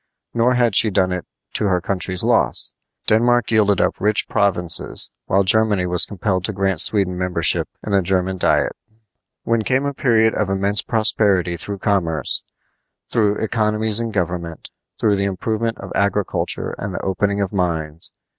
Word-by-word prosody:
Nor 120 +2 +2
had 120 -4 +1
she 110 - +5
done 95 -2 +1
it 90 -1 -4 0.3
to - - 0
her 90 -3 +2
country's 90 0 -1
loss. - - +1 0.3
Denmark 120 +1 +2
yielded 105 -3 +3
up - - 0
rich 105 +1 +2
provinces, 90 -5 +2 0.2
while 100 +1 +2
Germany 105 -1 +2
was 90 -1 +3
compelled 95 -2 -2
to 110 - -1
grant 95 -3 -1
Sweden 95 -4 +2
membership 90 0 0 0.2
in 105 - -3
the 100 - +4
German 95 +1 -1
diet. - - +1 0.7
Then 115 -1 +1
came 130 +4 0
a 140 - -2
period 115 -5 +2
of 105 -3 -1
immense 100 +1 +1
prosperity 100 -6 +1
through 100 +4 -4
commerce, 90 -6 -1 0.7
through 105 -2 +1
economies 110 -1 +1
in 115 -1 -2
government, 85 -5 -4 0.3
through 105 -2 +2
the 100 - 0
improvement 110 +4 -2
of 100 - -9
agriculture 100 0 -1
and 100 -2 -5
the - - -4
opening 100 +2 -1
of 100 -1 -2
mines. 80 -4 -3
100 Hz, 160 wpm, -19 LUFS, 90-110 Hz, 0.7 s, she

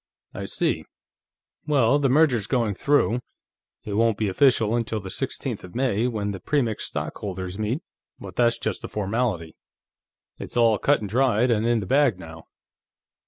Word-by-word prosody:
"I - - -5
see. - - -1 0.8
Well, 140 -2 +3
the 140 -2 +2
merger's 130 -6 +3
going 115 -6 +1
through. 125 +1 +2 0.6
It 105 - -5
won't 115 0 +2
be 110 -2 0
official 115 0 +3
until 115 -2 -1
the 95 -2 -7
sixteenth - - -3
of 90 +2 -12
May, 125 -3 +1
when 105 -4 -2
the 95 - -6
Premix 120 -6 -1
stockholders 95 -1 -5
meet, 115 +9 -2 0.4
but - - -9
that's 120 -1 +3
just 110 -4 -3
a - - -4
formality. 100 -5 -2 0.8
It's - - -7
all 115 -3 +4
cut 145 -3 +2
and 105 - -4
dried 125 +1 +2
and 110 0 +1
in 120 -2 +2
the - - -5
bag 135 -2 +3
now. 80 -2 -11
115 Hz, 165 wpm, -24 LUFS, 100-125 Hz, 0.8 s, all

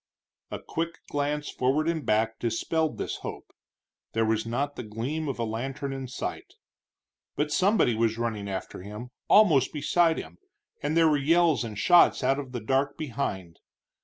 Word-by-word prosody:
A - - -4
quick 165 +1 -4 0.2
glance 145 +1 -1
forward 140 +5 +1
and 165 -2 -1
back 110 0 +1
dispelled 150 +7 -1
this - - -3
hope; - - -8 0.6
there 115 0 +2
was 110 0 0
not 140 +5 -2
the - - -5
gleam 125 +8 -4
of 135 - -3
a 120 - -1
lantern 135 +5 -3
in 135 -1 -5
sight. 125 - -6 0.8
But 150 0 -1
somebody 190 - +3
was 115 0 +1
running 110 -4 -3
after 95 -1 -5
him, 105 +6 -8 0.2
almost 160 - +5
beside 165 +2 +2
him, 80 +2 -8 0.4
and 150 +3 0
there 165 -1 +6
were 150 -2 +3
yells 160 +1 +3
and 110 -3 -6
shots 175 +10 +5
out 135 +1 +2
of 135 -3 -7
the 120 -2 -4
dark 135 +5 0
behind. 110 - -4
135 Hz, 165 wpm, -27 LUFS, 115-155 Hz, 0.8 s, there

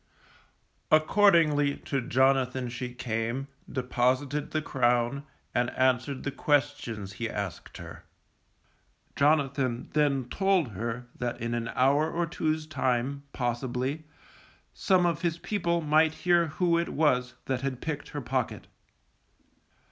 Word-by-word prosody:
Accordingly 155 -4 +4
to 140 -2 -2
Jonathan 130 0 +2
she 125 +1 -5
came, 120 +2 -3 0.2
deposited 130 +3 0
the 155 - -1
crown, 125 0 0 0.3
and 120 0 +1
answered 130 +1 +1
the 140 - -2
questions 140 -10 -1
she 115 -1 -2
asked 100 -5 -5
him. - - -9 1.2
Jonathan 140 -4 +1
then 140 -4 +2
told 190 -2 +1
her 115 +4 -4
that 120 -1 -3
in 115 0 -3
an 115 -1 -2
hour 140 +5 +3
or 170 0 -1
two's 155 -1 -2
time, 135 -2 -1
possibly, 125 +4 -2 0.7
some 185 -2 +2
of 170 -2 0
his 170 -2 0
people 170 -3 -1
might 155 +1 +3
hear 175 -1 +4
who 170 +2 +1
it 170 - -2
was 125 -5 +1
that 130 -2 -1
had 135 -2 -3
picked 150 -1 -4
her 145 - -5
pocket. 130 -1 -2
135 Hz, 125 wpm, -28 LUFS, 125-155 Hz, 1.2 s, Accordingly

